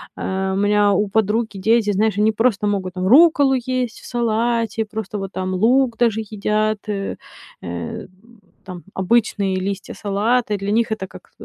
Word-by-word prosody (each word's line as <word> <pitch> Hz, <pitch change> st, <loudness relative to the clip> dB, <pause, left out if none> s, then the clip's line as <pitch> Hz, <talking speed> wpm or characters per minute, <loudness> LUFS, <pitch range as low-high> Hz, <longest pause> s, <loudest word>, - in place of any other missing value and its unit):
Э, 190 Hz, 0 st, -2 dB
у -, -, -1 dB
меня 205 Hz, 0 st, +3 dB
у 205 Hz, +2 st, +1 dB
подруги 220 Hz, 0 st, 0 dB
дети, 220 Hz, +1 st, +2 dB
знаешь, 205 Hz, 0 st, +1 dB
они 215 Hz, +1 st, +4 dB
просто 215 Hz, -2 st, +1 dB
могут, 190 Hz, -3 st, -2 dB
там, 185 Hz, 0 st, -2 dB
рукколу 285 Hz, -, +6 dB
есть 250 Hz, -1 st, -2 dB
в -, -, -15 dB
салате, 230 Hz, -1 st, -1 dB
просто 215 Hz, -1 st, -5 dB
вот 195 Hz, 0 st, -5 dB
там 185 Hz, 0 st, -3 dB
лук 235 Hz, +4 st, +2 dB
даже 225 Hz, -2 st, +1 dB
едят, 215 Hz, 0 st, -1 dB
э, 195 Hz, -1 st, -3 dB, 0.5 s
э, 85 Hz, -, -6 dB, 0.6 s
там, 180 Hz, -2 st, -9 dB
обычные 195 Hz, -1 st, +1 dB
листья 195 Hz, +1 st, -4 dB
салата. 210 Hz, +2 st, 0 dB
Для 195 Hz, +1 st, -3 dB
них 230 Hz, +1 st, +1 dB
это 190 Hz, -3 st, -5 dB
как -, -, -15 dB
210 Hz, 165 wpm, -20 LUFS, 195-230 Hz, 0.6 s, рукколу